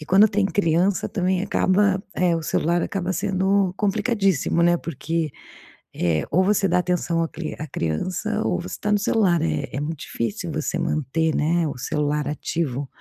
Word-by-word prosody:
e 155 Hz, -, -9 dB
quando 200 Hz, +5 st, +6 dB
tem 205 Hz, -1 st, +1 dB
criança 180 Hz, 0 st, +1 dB
também 185 Hz, -3 st, 0 dB
acaba, 195 Hz, -1 st, +2 dB
eh, 175 Hz, -2 st, +2 dB
o 165 Hz, -, -4 dB
celular 170 Hz, +2 st, +1 dB
acaba 185 Hz, 0 st, -2 dB
sendo 190 Hz, 0 st, +1 dB
complicadíssimo, 195 Hz, -, +1 dB
né, 175 Hz, 0 st, +4 dB
porque, 165 Hz, -1 st, -3 dB, 0.6 s
eh, 80 Hz, -3 st, 0 dB
ou 185 Hz, +5 st, +3 dB
você 200 Hz, 0 st, +2 dB
dá -, -, +2 dB
atenção 175 Hz, -2 st, 0 dB
à -, -, -1 dB
cri 160 Hz, 0 st, -6 dB
à 155 Hz, -, -5 dB
criança 185 Hz, -, -2 dB
ou -, -, 0 dB
você -, -, -6 dB
tá 210 Hz, -, -1 dB
no 210 Hz, -, +3 dB
celular. 195 Hz, -6 st, +2 dB
É 75 Hz, -1 st, -1 dB
é -, -, -1 dB
muito 155 Hz, 0 st, -4 dB
difícil 115 Hz, -3 st, -3 dB
você -, -, -2 dB
manter, 155 Hz, +2 st, 0 dB
né, 165 Hz, +2 st, +1 dB
o 145 Hz, -, -4 dB
celular 150 Hz, +2 st, -1 dB
ativo, 145 Hz, -3 st, -2 dB
175 Hz, 175 wpm, -23 LUFS, 155-195 Hz, 0.6 s, quando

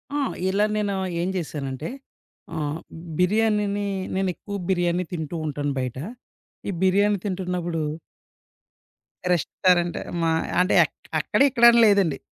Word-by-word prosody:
ఆ! -, -, +1 dB, 0.3 s
ఇలా 200 Hz, +2 st, +2 dB
నేను 205 Hz, -1 st, 0 dB, 0.3 s
ఏం 180 Hz, -, -1 dB
చేశానంటే, 150 Hz, -3 st, -4 dB, 0.7 s
ఆహ్, 150 Hz, +1 st, -2 dB, 0.4 s
బిర్యానీని 205 Hz, +1 st, +2 dB, 0.3 s
నేనెక్కువ 190 Hz, +2 st, -3 dB
బిర్యానీ 175 Hz, -1 st, +1 dB
తింటూంటాను 155 Hz, -3 st, -3 dB
బయట. 130 Hz, -1 st, -3 dB, 0.7 s
ఈ -, -, 0 dB
బిర్యానీ 200 Hz, +2 st, +3 dB
తింటున్నప్పుడు 180 Hz, -3 st, -2 dB, 1.5 s
రెస్టారెంట్ 175 Hz, +1 st, +1 dB, 0.2 s
మా 165 Hz, 0 st, +2 dB, 0.3 s
అంటే, 185 Hz, -, +2 dB
ఎక్ -, -, -11 dB, 0.2 s
అక్కడిక్కడని 235 Hz, -4 st, +5 dB
లేదండి. 195 Hz, -9 st, +3 dB
180 Hz, 95 wpm, -24 LUFS, 160-205 Hz, 1.5 s, అక్కడిక్కడని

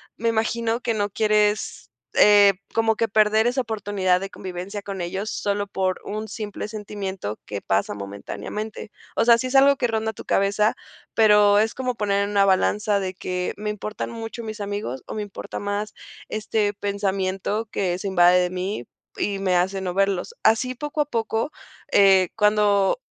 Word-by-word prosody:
me 230 Hz, +1 st, 0 dB
imagino 230 Hz, +1 st, 0 dB
que 230 Hz, -2 st, -1 dB
no 205 Hz, -1 st, -1 dB
quieres, 210 Hz, 0 st, +1 dB, 0.2 s
eh, 205 Hz, -1 st, +7 dB, 0.2 s
como 225 Hz, -1 st, +2 dB
que 230 Hz, -, 0 dB
perder 215 Hz, +2 st, +3 dB
esa 255 Hz, +2 st, +1 dB
oportunidad 205 Hz, -5 st, 0 dB
de 195 Hz, -, -4 dB
convivencia 190 Hz, +2 st, -6 dB
con 195 Hz, -2 st, -5 dB
ellos, 190 Hz, +5 st, -3 dB
solo 205 Hz, 0 st, -1 dB
por 190 Hz, -2 st, -2 dB
un 215 Hz, +1 st, -4 dB
simple 210 Hz, -1 st, -5 dB
sentimiento 200 Hz, -, -5 dB
que 100 Hz, -1 st, -5 dB
pasa 100 Hz, +1 st, 0 dB
momentáneamente. 105 Hz, -, -6 dB, 0.2 s
O -, -, +2 dB
sea, 235 Hz, 0 st, +6 dB
sí 255 Hz, -, -2 dB
es 265 Hz, -, -4 dB
algo 280 Hz, +1 st, +7 dB
que 250 Hz, -3 st, 0 dB
ronda 220 Hz, -1 st, -1 dB
tu -, -, -10 dB
cabeza, 200 Hz, +2 st, +2 dB, 0.4 s
pero 210 Hz, -2 st, +6 dB
es 220 Hz, +1 st, +2 dB
como 255 Hz, -2 st, -2 dB
poner 200 Hz, -1 st, +1 dB
en -, -, -5 dB
una 200 Hz, -1 st, +3 dB
balanza 205 Hz, +2 st, +2 dB
de 185 Hz, -1 st, -4 dB
que 180 Hz, 0 st, -3 dB
me 210 Hz, 0 st, -3 dB
importan 210 Hz, +2 st, -5 dB
mucho 230 Hz, 0 st, -6 dB
mis 215 Hz, -1 st, -6 dB
amigos, 200 Hz, -, -4 dB
o -, -, -6 dB
me 215 Hz, -, -2 dB
importa 205 Hz, -, -8 dB
más 205 Hz, +1 st, -3 dB, 0.3 s
este 215 Hz, -1 st, -1 dB
pensamiento 200 Hz, +1 st, -2 dB
que 180 Hz, -2 st, -1 dB
se 200 Hz, -, -5 dB
invade 180 Hz, -1 st, +5 dB
de 180 Hz, 0 st, +1 dB
mí 185 Hz, -6 st, -3 dB, 0.4 s
y 200 Hz, -1 st, -1 dB
me 185 Hz, -2 st, +1 dB
hace 190 Hz, +2 st, +1 dB
no 180 Hz, -1 st, -3 dB
verlos. 195 Hz, -, 0 dB
Así, 255 Hz, +3 st, +3 dB
poco 295 Hz, +4 st, -2 dB
a 295 Hz, -, +1 dB
poco, 225 Hz, +3 st, -1 dB, 0.4 s
eh, 190 Hz, -2 st, +5 dB
cuando 210 Hz, -, +3 dB
205 Hz, 175 wpm, -23 LUFS, 195-220 Hz, 0.4 s, eh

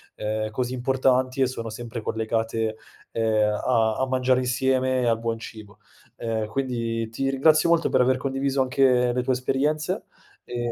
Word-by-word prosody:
ehm, 110 Hz, 0 st, -2 dB
così 125 Hz, +3 st, -3 dB
importanti 130 Hz, 0 st, +1 dB
e -, -, +5 dB
sono 115 Hz, -3 st, -5 dB
sempre 115 Hz, +1 st, -6 dB
collegate, 110 Hz, 0 st, -2 dB, 0.3 s
ehm, 110 Hz, -2 st, +1 dB
a 115 Hz, -3 st, +2 dB
a 130 Hz, -, 0 dB
mangiare 130 Hz, 0 st, +2 dB
insieme 130 Hz, 0 st, +1 dB
e -, -, 0 dB
al 115 Hz, -1 st, +2 dB
buon 115 Hz, 0 st, -2 dB
cibo. 110 Hz, -2 st, -11 dB, 0.4 s
Ehm, 110 Hz, -2 st, -2 dB
quindi 115 Hz, -2 st, -2 dB
ti 135 Hz, +4 st, -2 dB
ringrazio 155 Hz, +4 st, +4 dB
molto 170 Hz, -1 st, +3 dB
per -, -, +3 dB
aver 130 Hz, +1 st, +3 dB
condiviso 135 Hz, +1 st, -1 dB
anche 130 Hz, -2 st, +3 dB
le 125 Hz, -, 0 dB
tue 130 Hz, +1 st, 0 dB
esperienze 140 Hz, +4 st, -1 dB, 0.4 s
e 120 Hz, -1 st, -3 dB
125 Hz, 160 wpm, -24 LUFS, 115-130 Hz, 0.4 s, e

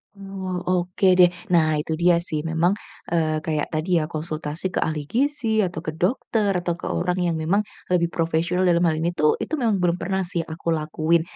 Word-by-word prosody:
Oh, 195 Hz, -2 st, -6 dB
oke 180 Hz, +1 st, 0 dB
deh, 180 Hz, -1 st, +8 dB, 0.2 s
nah 155 Hz, -2 st, +4 dB
itu 150 Hz, +2 st, -2 dB
dia 175 Hz, 0 st, +5 dB
sih 170 Hz, -2 st, -2 dB
memang, 165 Hz, +3 st, +1 dB, 0.4 s
eee, 160 Hz, -2 st, +1 dB
kayak 155 Hz, -2 st, -1 dB
tadi 155 Hz, +3 st, -2 dB
ya, -, -, -1 dB
konsultasi 155 Hz, +2 st, -4 dB
ke -, -, 0 dB
ahli 155 Hz, -1 st, -1 dB
gizi 235 Hz, -, +1 dB
atau 175 Hz, -4 st, -3 dB
ke 155 Hz, -, -1 dB
dokter 200 Hz, +2 st, 0 dB
atau 175 Hz, -1 st, -1 dB
ke -, -, -5 dB
orang 180 Hz, 0 st, -1 dB
yang 170 Hz, -, 0 dB
memang, 170 Hz, +6 st, +1 dB, 0.3 s
lebih 170 Hz, -2 st, +2 dB
profesional 170 Hz, +2 st, 0 dB
dalam 170 Hz, -1 st, +3 dB
hal 160 Hz, -, 0 dB
ini 170 Hz, +2 st, -1 dB
tuh, 150 Hz, -3 st, +2 dB
itu -, -, -6 dB
memang 225 Hz, -4 st, +2 dB
belum 180 Hz, -2 st, +2 dB
pernah 190 Hz, +2 st, -1 dB
sih 175 Hz, -1 st, -2 dB
aku 165 Hz, +1 st, -3 dB
lakuin. 155 Hz, +1 st, +1 dB
170 Hz, 195 wpm, -23 LUFS, 160-185 Hz, 0.4 s, deh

